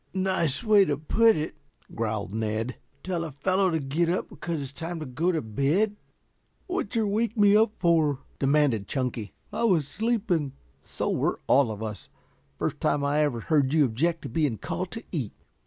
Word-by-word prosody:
"Nice 185 - 0
way 210 -3 +6
to 145 -5 0
put 225 +9 +4
it," 155 0 -3 0.4
growled 105 -3 -2
Ned. 110 +2 -2 0.3
"Tell 180 -3 -2
a 160 - -5
fellow 185 +7 +1
to 165 - +1
get 155 +5 0
up 180 - -1
because 170 -2 -4
it's 140 -1 -6
time 165 +3 -5
to 155 - -5
go 155 +8 0
to 160 -5 -1
bed." 145 - +1 0.7
"Wat'cher 230 - -1
wake 220 +3 0
me 205 -1 +6
up 215 0 +4
for?" 160 -6 +2 0.2
demanded 135 -7 +2
Chunky. 125 -6 -3 0.2
"I - - -1
was 170 -10 +3
sleeping." 195 - 0 0.3
"So - - -3
were - - 0
all 135 -3 +4
of 110 0 -5
us. 105 -2 -6 0.5
First - - -2
time 145 0 +1
I 145 +1 +1
ever 145 -6 +1
heard 145 +1 +2
you 150 -2 +5
object 160 +8 0
to - - -5
being 150 -8 0
called 185 - -4
to 225 0 -6
eat." 135 - -3
155 Hz, 180 wpm, -27 LUFS, 130-185 Hz, 0.7 s, way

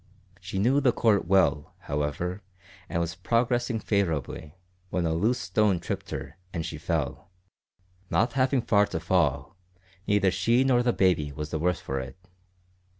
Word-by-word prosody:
She 90 +1 -6
knew 125 +8 +3
the 130 -3 +4
court 110 -6 +2
well, 90 -6 +2
however, 75 +6 -3 0.5
and 85 - -1
was 85 0 -1
progressing 120 +4 0
favourably, 80 - -2 0.3
when 90 -1 -1
a 80 - +1
loose 110 +10 +1
stone 105 -5 +1
tripped 95 +1 -5
her - - -6
and 85 -3 -3
she - - -6
fell. - - -3 0.8
Not 115 +1 +1
having 130 -1 +2
far 105 -1 +3
to 80 - -3
fall, 70 -4 0 0.5
neither 100 -2 +3
she 120 +6 +2
nor 130 -2 +3
the 120 0 +2
baby 85 -9 +2
was 75 +1 -6
the 80 - -2
worse 90 +2 +1
for 70 0 -3
it. 65 +4 -8
95 Hz, 155 wpm, -27 LUFS, 80-115 Hz, 0.8 s, the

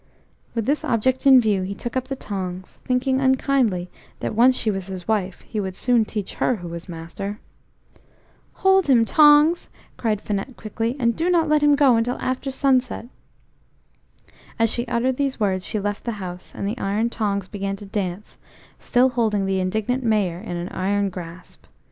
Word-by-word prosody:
With 230 -2 -1
this 290 +3 0
object 255 +4 +1
in 265 -1 +9
view 210 -5 +1
he 190 +2 -4
took 240 +4 -6
up 260 0 -1
the 270 - -3
tongs, 185 -6 -6
thinking 260 +1 +1
unkindly 260 -8 +2 0.3
that - - -3
once 250 +4 +5
she 220 - +1
was 195 -2 -4
his 185 -2 -7
wife, 195 -4 -1
he 215 - -5
would 190 -2 -3
soon 240 +1 +2
teach 210 -2 -5
her 255 - +3
who 175 -5 -8
was 170 +2 -8
master. 175 +5 -6 1.3
"Hold 385 -2 +5
him, 240 -4 +5
tongs," 300 +4 +5 0.3
cried 215 -3 0
Finette 210 +4 -4
quickly, 225 +3 -3
"and 235 -2 +2
do 335 +2 0
not 335 -3 +3
let 305 -1 +3
him 295 -1 +5
go 275 -5 +5
until 240 +2 0
after 255 +2 -2
sunset." 260 -3 0 1.5
As 225 -1 +2
she 240 0 -2
uttered 245 +2 0
these 275 -3 -1
words 190 -3 0
she 215 - -1
left 205 0 -3
the 235 - -2
house, 180 -3 -7
and 200 - -3
the 220 +5 -3
iron 210 +4 0
tongs 200 -4 -2
began 195 -1 -3
to 205 - -11
dance, 195 -1 -5 0.4
still 250 +1 +3
holding 220 -5 0
the 190 0 0
indignant 220 +7 -1
Mayor 205 -7 +1
in 180 -4 -5
an 175 +2 -4
iron 200 +1 -1
grasp. 175 -1 -10
220 Hz, 180 wpm, -22 LUFS, 195-255 Hz, 1.5 s, in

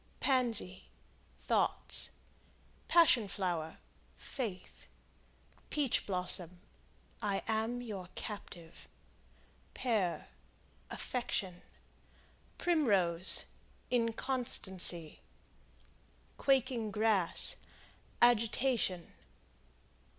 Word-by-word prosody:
Pansy 235 -8 +1 0.5
Thoughts. - - +1 0.8
Passion 285 -11 +5
Flower 175 -5 -3 0.4
Faith. 215 -9 -6 0.8
Peach 285 -5 0
Blossom 180 -2 -2 0.6
I 200 -2 -1
am 225 +3 -1
your 195 -6 -7
captive. 175 -5 -8 0.9
Pear 215 -8 -1 0.6
Affection. 195 -8 -3 1.0
Primrose 195 - +2 0.5
Inconstancy. 230 - +1 1.2
Quaking 255 -5 +1
Grass 210 -4 +2 0.7
Agitation. 230 -5 +2
215 Hz, 55 wpm, -33 LUFS, 180-245 Hz, 1.2 s, Passion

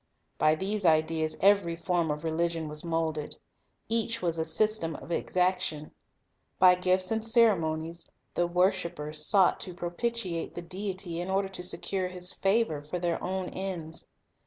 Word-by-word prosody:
By 155 0 +4
these 200 +5 -2
ideas 160 -1 +2
every 200 -4 +4
form 170 -1 0
of 150 +1 -3
religion 165 0 -1
was 150 0 -6
moulded. 160 -3 -2 0.5
Each 230 0 0
was 170 -2 -1
a 160 - 0
system 165 -2 +1
of 170 - -9
exaction. 180 -4 0 0.7
By 185 -1 +7
gifts 185 +1 +2
and 220 0 0
ceremonies, 170 -8 +2 0.2
the 175 - +1
worshipers 170 -4 0
sought 190 +2 +4
to 180 - -5
pro 175 0 -4
pitiate 190 -4 -2
the 175 - -5
Deity, 185 -1 -4
in 175 +2 -4
order 195 0 +1
to 185 -2 -7
secure 185 +1 -2
His 180 0 -4
favor 195 -6 +1
for 150 +5 -5
their 175 -1 -1
own 185 0 -2
ends. 175 -4 -5
175 Hz, 155 wpm, -29 LUFS, 160-190 Hz, 0.7 s, By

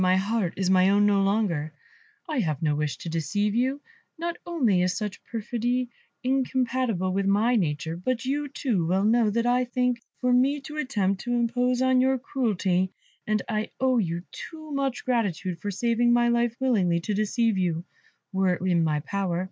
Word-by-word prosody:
My 185 0 +4
heart 200 -2 -1
is 190 -1 0
mine 190 +2 +4
no 200 -1 +3
longer; 195 -7 0 0.5
I 305 -5 -1
have 155 - -1
no 150 -2 +2
wish 150 -1 -2
to - - -9
deceive 200 +6 -1
you; 260 +5 0 0.4
not 340 +1 -3
only 245 - +2
is 180 0 0
such 210 -3 -5
perfidy 240 +2 -2 0.3
incompatible 255 -7 0
with 195 0 0
my 215 +5 +3
nature, 160 -4 -1
but 235 +6 -2
you 290 +2 -1
too 240 - -1
well 190 +3 +2
know 230 +2 +4
what 230 +3 0
I 245 +1 +3
think 250 -1 0 0.2
for 250 -1 +1
me 270 +4 +3
to 300 +2 -8
attempt 200 -9 0
to 245 - -1
impose 245 +1 +1
on 260 -1 +4
your 265 +1 +3
credulity, 195 -8 0 0.4
and 215 -1 +1
I 215 0 -2
owe 260 -2 +3
you 170 -3 -2
too 315 -2 -9
much 275 -2 -2
gratitude 190 -8 -1
for 205 - -4
saving 235 +4 +1
my 240 0 +4
life 235 -1 +1
willingly 195 -10 +2
to 210 - -2
deceive 215 0 +1
you, 175 -2 -1 0.5
were 190 -1 +2
it - - -11
in 175 -3 +2
my 150 -2 0
power. 185 +1 -2
220 Hz, 180 wpm, -26 LUFS, 185-250 Hz, 0.5 s, My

